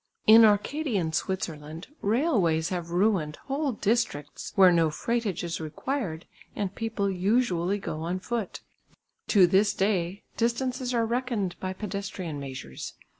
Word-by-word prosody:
In 225 Hz, +1 st, +9 dB
Arcadian 210 Hz, -, +1 dB
Switzerland 160 Hz, -3 st, -3 dB, 0.2 s
railways 200 Hz, -, +2 dB
have 175 Hz, -2 st, -3 dB
ruined 175 Hz, -4 st, +1 dB
whole 280 Hz, +1 st, -1 dB
districts 210 Hz, -10 st, -1 dB
where 190 Hz, -2 st, +7 dB
no 165 Hz, -2 st, +3 dB
freightage 225 Hz, +4 st, -2 dB
is 170 Hz, -1 st, -3 dB
required 165 Hz, -, -3 dB, 0.3 s
and 200 Hz, -2 st, -2 dB
people 225 Hz, -2 st, -2 dB
usually 195 Hz, -1 st, +1 dB
go 155 Hz, -5 st, -5 dB
on 175 Hz, +3 st, -2 dB
foot. 230 Hz, -1 st, -4 dB, 0.7 s
To 195 Hz, -4 st, +6 dB
this 195 Hz, +3 st, +3 dB
day 190 Hz, -1 st, 0 dB
distances 250 Hz, +2 st, 0 dB
are 235 Hz, -2 st, +1 dB
reckoned 235 Hz, -6 st, -1 dB
by 185 Hz, 0 st, -3 dB
pedestrian 195 Hz, -6 st, -5 dB
measures. 130 Hz, -, -7 dB
195 Hz, 125 wpm, -27 LUFS, 170-230 Hz, 0.7 s, In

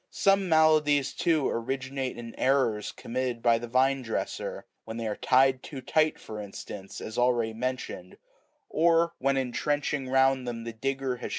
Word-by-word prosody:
Some 195 Hz, -1 st, +2 dB
maladies, 150 Hz, -3 st, +4 dB
too, 160 Hz, -5 st, +1 dB
originate 130 Hz, +1 st, -3 dB
in 115 Hz, -1 st, -8 dB
errors 130 Hz, -6 st, +1 dB
committed 125 Hz, -1 st, -4 dB
by 115 Hz, -1 st, +4 dB
the 120 Hz, -, -6 dB
vine 130 Hz, +3 st, +2 dB
dresser; 115 Hz, -3 st, -4 dB, 0.2 s
when 110 Hz, 0 st, -7 dB
they 115 Hz, -, -3 dB
are 105 Hz, -1 st, -2 dB
tied 130 Hz, 0 st, +3 dB
too 140 Hz, -, -8 dB
tight, 155 Hz, +4 st, +1 dB
for 105 Hz, -1 st, -7 dB
instance, 100 Hz, -1 st, -8 dB
as 110 Hz, +2 st, -5 dB
already 120 Hz, -2 st, +2 dB
mentioned,98 125 Hz, -6 st, -5 dB, 0.5 s
or 170 Hz, +1 st, +3 dB
when 135 Hz, +1 st, +1 dB
in 130 Hz, -2 st, -1 dB
trenching 145 Hz, +2 st, -1 dB
round 130 Hz, -1 st, +3 dB
them 115 Hz, -1 st, -4 dB
the 115 Hz, 0 st, -6 dB
digger 135 Hz, +2 st, -2 dB
has -, -, -6 dB
130 Hz, 165 wpm, -28 LUFS, 115-140 Hz, 0.5 s, maladies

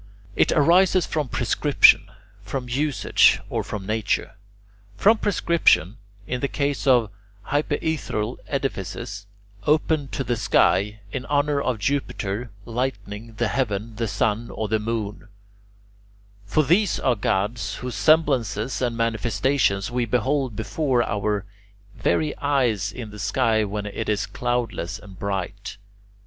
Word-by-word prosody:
It -, -, +3 dB
arises 175 Hz, +3 st, +4 dB
from 150 Hz, -3 st, -2 dB
prescription -, -, +4 dB
[Greek: -, -, -21 dB
(thematismo)], 100 Hz, 0 st, -25 dB
from 125 Hz, 0 st, -4 dB
usage, 140 Hz, +3 st, +3 dB
or -, -, -1 dB
from 100 Hz, -2 st, -6 dB
nature. 110 Hz, 0 st, -1 dB, 0.7 s
From 220 Hz, -, +4 dB
prescription, 170 Hz, -, +2 dB, 0.3 s
in 125 Hz, -, -3 dB
the 140 Hz, -, +1 dB
case 140 Hz, -1 st, -2 dB
of 120 Hz, -5 st, +4 dB, 0.4 s
hypaethral 145 Hz, -6 st, -1 dB
edifices, 100 Hz, -6 st, -4 dB, 0.4 s
open 155 Hz, -1 st, +2 dB
to 135 Hz, -, -3 dB
the 120 Hz, -2 st, -1 dB
sky, 105 Hz, +1 st, +2 dB
in 130 Hz, 0 st, -5 dB
honour 145 Hz, 0 st, +1 dB
of 130 Hz, -4 st, -1 dB
Jupiter 115 Hz, -3 st, -2 dB, 0.2 s
Lightning, 115 Hz, -2 st, -4 dB
the 115 Hz, +1 st, 0 dB
Heaven, 110 Hz, -2 st, -2 dB
the 115 Hz, 0 st, -1 dB
Sun, 105 Hz, +2 st, -1 dB
or 110 Hz, -, -3 dB
the 110 Hz, +1 st, +1 dB
Moon: 110 Hz, -1 st, -4 dB, 1.2 s
for 155 Hz, +9 st, +2 dB
these 180 Hz, +6 st, +2 dB
are 125 Hz, -, +2 dB
gods 105 Hz, +3 st, -1 dB
whose 125 Hz, 0 st, -5 dB
semblances 130 Hz, -8 st, +2 dB
and 120 Hz, -2 st, -1 dB
manifestations 115 Hz, -1 st, +1 dB
we 120 Hz, 0 st, 0 dB
behold 130 Hz, +1 st, 0 dB
before 125 Hz, +3 st, 0 dB
our 105 Hz, -1 st, -1 dB, 0.5 s
very 150 Hz, -, 0 dB
eyes 125 Hz, -8 st, +1 dB
in 115 Hz, -2 st, -8 dB
the 105 Hz, -, -10 dB
sky 110 Hz, +2 st, +1 dB
when 105 Hz, 0 st, -4 dB
it 105 Hz, +2 st, -4 dB
is 105 Hz, 0 st, 0 dB
cloudless 120 Hz, -4 st, -2 dB
and 95 Hz, -3 st, -14 dB
bright. 100 Hz, 0 st, -4 dB
115 Hz, 135 wpm, -23 LUFS, 105-140 Hz, 1.2 s, arises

